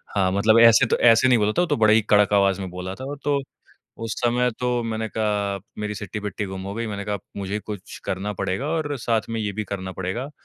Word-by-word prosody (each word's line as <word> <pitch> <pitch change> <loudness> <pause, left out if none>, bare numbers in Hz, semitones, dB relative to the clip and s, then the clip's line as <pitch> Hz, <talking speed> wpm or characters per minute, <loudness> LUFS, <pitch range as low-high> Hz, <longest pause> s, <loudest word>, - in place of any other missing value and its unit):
हाँ, 95 -2 +2
मतलब 110 +4 +4
ऐसे 115 +2 +7
तो - - +1
ऐसे 115 +2 +5
नहीं 125 -2 +5
बोला 105 -1 +2
था, - - +5
वो - - +3
तो - - 0
बड़े 110 -1 +5
ही 110 - +5
कड़क 105 -1 +3
आवाज़ 100 -1 +3
में 95 - -5
बोला 90 +1 -6
था। 130 - -8 0.2
तो 145 -1 +1 0.6
उस 115 -1 -2
समय 125 +1 +2
तो, 125 -1 0
मैंने 110 -1 -2
कहा 105 -2 0 0.2
मेरी 105 0 -3
सिट्टी-बिट्टी 105 +1 -5
गुम 95 -1 -6
हो 100 +1 -5
गई, 115 0 -3
मैंने 100 -1 -5
कहा, 105 -1 -2 0.2
"मुझे 100 +1 -3
कुछ 105 -2 -8
करना 100 +3 -3
पड़ेगा 95 +8 -2
और 155 -3 -1
साथ 115 -1 0
में 115 0 -2
ये 105 -1 -2
भी - - 0
करना 95 -2 -4
पड़ेगा। 115 +9 -3
105 Hz, 235 wpm, -23 LUFS, 100-115 Hz, 0.6 s, ऐसे